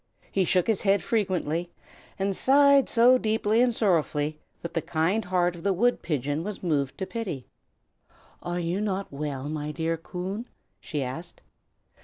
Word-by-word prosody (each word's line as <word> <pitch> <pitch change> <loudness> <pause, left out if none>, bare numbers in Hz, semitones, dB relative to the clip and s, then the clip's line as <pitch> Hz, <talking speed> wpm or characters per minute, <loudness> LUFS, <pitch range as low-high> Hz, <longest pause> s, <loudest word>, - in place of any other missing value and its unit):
He 190 -1 +2
shook 180 +1 +2
his 220 -4 +1
head 200 0 +2
frequently, 175 -6 -1 0.5
and 195 0 -1
sighed 280 +2 +5
so 250 +2 +6
deeply 220 0 +2
and 250 -1 +4
sorrowfully 155 -8 0 0.2
that 170 - -6
the 165 - 0
kind 175 +7 0
heart 180 -1 +1
of 170 - -10
the 195 +2 +1
wood 240 +7 +2
pigeon 145 0 -2
was 210 0 -6
moved 145 -6 0
to 190 - -3
pity. 185 - -5 1.0
"Are 175 0 -3
you 175 +3 -1
not 200 -2 -2
well, 140 -1 -4
my 150 0 -3
dear 165 +1 -1
Coon?" 185 +7 -5 0.3
she 150 -4 -3
asked. 160 +7 -7
180 Hz, 160 wpm, -27 LUFS, 155-210 Hz, 1.0 s, so